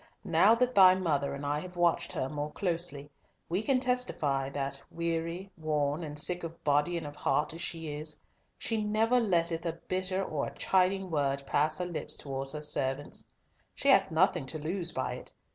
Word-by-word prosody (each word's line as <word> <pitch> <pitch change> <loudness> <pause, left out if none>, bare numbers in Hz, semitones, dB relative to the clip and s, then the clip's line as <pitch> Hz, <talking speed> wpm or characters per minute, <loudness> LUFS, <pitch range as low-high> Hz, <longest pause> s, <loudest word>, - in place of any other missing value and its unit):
"Now 225 - +5
that 250 +1 +1
thy 185 -3 +8
mother 145 -7 0
and 140 +1 -6
I 145 +1 0
have 180 +3 -9
watched 175 -3 +2
her 130 - -1
more 145 +1 -4
closely, 165 -6 -3 0.4
we 180 +4 0
can 260 +3 +2
testify 155 - 0
that, 140 0 -3
weary, 170 +3 -3
worn, 150 0 0
and 150 -1 -6
sick 175 +4 0
of 165 0 -8
body 150 +4 +2
and 165 - -5
of 145 0 -7
heart 150 +1 0
as 165 - -7
she 165 -3 -4
is, 150 0 -3 0.4
she 220 -2 -1
never 220 +4 +2
letteth 170 -6 +1
a 165 -2 -1
bitter 185 +3 -2
or 150 -6 -2
a - - -9
chiding 190 0 +1
word 140 -2 0
pass 155 +3 +1
her 180 - -2
lips 175 -3 0
towards 135 0 -5
her 150 0 -5
servants. 145 -1 -2 0.5
She 280 - 0
hath 195 -8 +5
nothing 165 -3 +2
to 155 - -4
lose 170 +3 +3
by - - -2
it. - - -8
165 Hz, 190 wpm, -30 LUFS, 145-185 Hz, 0.5 s, thy